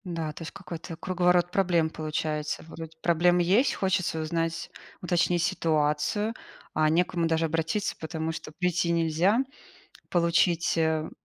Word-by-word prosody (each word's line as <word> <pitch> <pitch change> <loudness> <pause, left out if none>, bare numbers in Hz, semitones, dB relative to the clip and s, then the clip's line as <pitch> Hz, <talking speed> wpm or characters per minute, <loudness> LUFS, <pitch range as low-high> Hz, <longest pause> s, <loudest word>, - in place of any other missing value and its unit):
Да, 165 -4 -3
то - - -11
есть 165 - -6
какой-то 175 -3 -8
круговорот 180 0 +2
проблем 175 -4 +2
получается. 155 -1 -3
Вроде 160 -1 -8
проблема 175 +1 +4
есть, 200 +10 +3
хочется 190 -4 0
узнать, 165 +1 -2 0.3
уточнить 175 -1 +1
ситуацию. 160 +5 +1 0.4
А 155 0 +3
не 165 +3 +4
к - - -13
кому 170 -2 0
даже 165 0 +1
обратиться, 165 +5 -1
потому 160 0 -3
что 160 - -7
прийти 175 +1 0
нельзя. 170 +6 +2 0.7
Получить, 170 0 +2
э, 160 -1 +1
165 Hz, 140 wpm, -27 LUFS, 160-180 Hz, 0.7 s, проблема